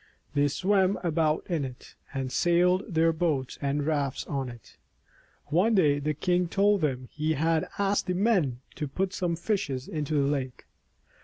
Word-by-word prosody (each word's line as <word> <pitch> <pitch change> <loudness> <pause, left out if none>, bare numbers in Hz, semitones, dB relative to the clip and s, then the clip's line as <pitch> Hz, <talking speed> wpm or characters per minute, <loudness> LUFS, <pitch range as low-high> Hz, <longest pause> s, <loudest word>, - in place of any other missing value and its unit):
They 145 0 +3
swam 190 +5 +2
about 160 -2 +1
in 165 -5 -1
it, 130 -2 -8 0.2
and 135 -2 -3
sailed 180 +5 +2
their 165 0 +3
boats 155 -6 -1
and 140 0 0
rafts 145 -4 -1
on 135 -3 -3
it. 120 -1 -13 0.7
One 190 +9 +3
day 150 -7 +4
the 150 +1 -1
king 180 +4 +1
told 200 +2 +2
them 130 -4 -1
he 155 +1 -1
had 160 +2 +1
asked 200 0 +1
the 180 - 0
men 180 - +1 0.2
to 150 - -2
put 185 +7 -2
some 175 -3 -1
fishes 160 - -2
into 150 -1 -2
the 140 -1 +3
lake. 135 -3 -3
155 Hz, 165 wpm, -28 LUFS, 140-180 Hz, 0.7 s, day